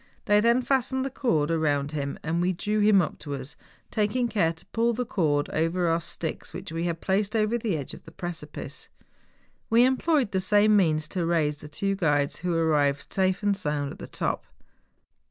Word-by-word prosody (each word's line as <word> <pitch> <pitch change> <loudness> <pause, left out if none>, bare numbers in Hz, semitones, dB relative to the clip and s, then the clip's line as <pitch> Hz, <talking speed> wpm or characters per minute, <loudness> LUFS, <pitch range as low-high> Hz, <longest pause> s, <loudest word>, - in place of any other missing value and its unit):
They 205 0 +4
then 235 +3 +3
fastened 265 0 +1
the 270 - -3
cord 165 - +1
round 145 -3 +1
him, 140 -2 -3
and 165 +2 0
we 185 +1 +1
drew 210 +5 -1
him 205 -3 +5
up - - -5
to 145 -2 -5
us, 135 +1 -8 0.4
taking 220 +4 +1
care 190 -8 +1
to 165 0 -14
pull 230 +1 +2
the 250 +2 -2
cord 150 -9 +1
over 165 +3 0
our 165 +1 +1
sticks 165 0 -4
which - - -7
we 165 +1 -2
had 170 -1 -2
placed 200 +3 0
over 215 +1 +2
the 220 -7 -1
edge 140 - -6
of - - -12
the 165 - -12
precipice. 165 -3 -7 0.8
We 230 +1 +5
emj 260 +4 +1
loyed 290 -10 +3
the 190 - 0
same 210 +2 +4
means 155 -6 +2
to 180 - -2
raise 160 -3 +1
the 150 - -9
two 195 +6 -1
guides, 145 -6 +1
who 175 -1 -2
arrived 150 -4 +1
safe 190 +1 +1
and 205 -1 +2
sound 150 -6 -2
at - - -11
the - - -7
top. - - -3
175 Hz, 205 wpm, -26 LUFS, 155-215 Hz, 0.8 s, him